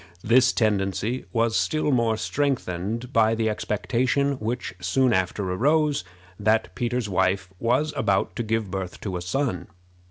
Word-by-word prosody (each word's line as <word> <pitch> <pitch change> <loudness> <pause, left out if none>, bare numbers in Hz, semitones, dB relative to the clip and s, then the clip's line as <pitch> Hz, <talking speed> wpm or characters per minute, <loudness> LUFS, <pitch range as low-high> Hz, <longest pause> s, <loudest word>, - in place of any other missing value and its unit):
This 125 +3 +5
tendency 105 +2 0
was 115 -1 +1
still 155 -1 +1
more 115 -3 +2
strengthened 115 -3 -2
by 110 0 +4
the 110 0 0
expectation 115 +8 0
which 115 0 -3
soon 120 +8 +2
after 95 +1 0
arose, 150 - +2 0.4
that 110 +2 +1
Peter's 120 -1 -1
wife 95 0 0
was 130 +6 +1
about 100 -3 0
to - - -1
give 110 -3 -1
birth 95 -2 -4
to 95 -3 -4
a 90 - -3
son. 90 -1 -2
110 Hz, 145 wpm, -25 LUFS, 95-125 Hz, 0.4 s, This